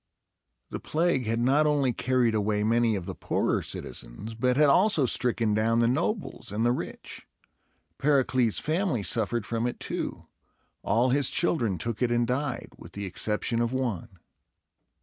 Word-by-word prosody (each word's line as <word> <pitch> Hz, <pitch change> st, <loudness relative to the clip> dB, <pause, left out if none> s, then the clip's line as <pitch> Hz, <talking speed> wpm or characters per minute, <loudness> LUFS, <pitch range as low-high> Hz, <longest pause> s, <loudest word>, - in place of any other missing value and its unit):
The -, -, -4 dB
plague 155 Hz, -7 st, 0 dB
had 115 Hz, +1 st, 0 dB
not 140 Hz, +5 st, +3 dB
only 140 Hz, -4 st, +2 dB
carried 125 Hz, -1 st, +1 dB
away 105 Hz, -1 st, 0 dB
many 115 Hz, 0 st, +2 dB
of 95 Hz, -3 st, -4 dB
the -, -, -5 dB
poorer -, -, -1 dB
citizens, 95 Hz, -, -7 dB
but 125 Hz, +3 st, 0 dB
had 150 Hz, -, +6 dB
also 160 Hz, +1 st, +4 dB
stricken 115 Hz, -3 st, +1 dB
down 110 Hz, +2 st, +2 dB
the 115 Hz, 0 st, +3 dB
nobles 170 Hz, -, -2 dB
and 110 Hz, +3 st, 0 dB
the 120 Hz, -, +4 dB
rich. 125 Hz, -, -6 dB, 0.7 s
Pericles' 130 Hz, -5 st, +2 dB
family 160 Hz, -, 0 dB
suffered 115 Hz, +1 st, -1 dB
from 115 Hz, +1 st, -1 dB
it 120 Hz, -, -5 dB
too. -, -, -4 dB, 0.6 s
All 120 Hz, +5 st, +2 dB
his 140 Hz, -1 st, +2 dB
children 120 Hz, -, 0 dB
took 115 Hz, +6 st, -4 dB
it 125 Hz, -, +2 dB
and 120 Hz, 0 st, +2 dB
died, 125 Hz, +2 st, -2 dB
with -, -, -12 dB
the 100 Hz, 0 st, -5 dB
exception 105 Hz, +5 st, -2 dB
of 120 Hz, 0 st, 0 dB
one. 120 Hz, -6 st, -3 dB
120 Hz, 160 wpm, -27 LUFS, 110-130 Hz, 0.7 s, had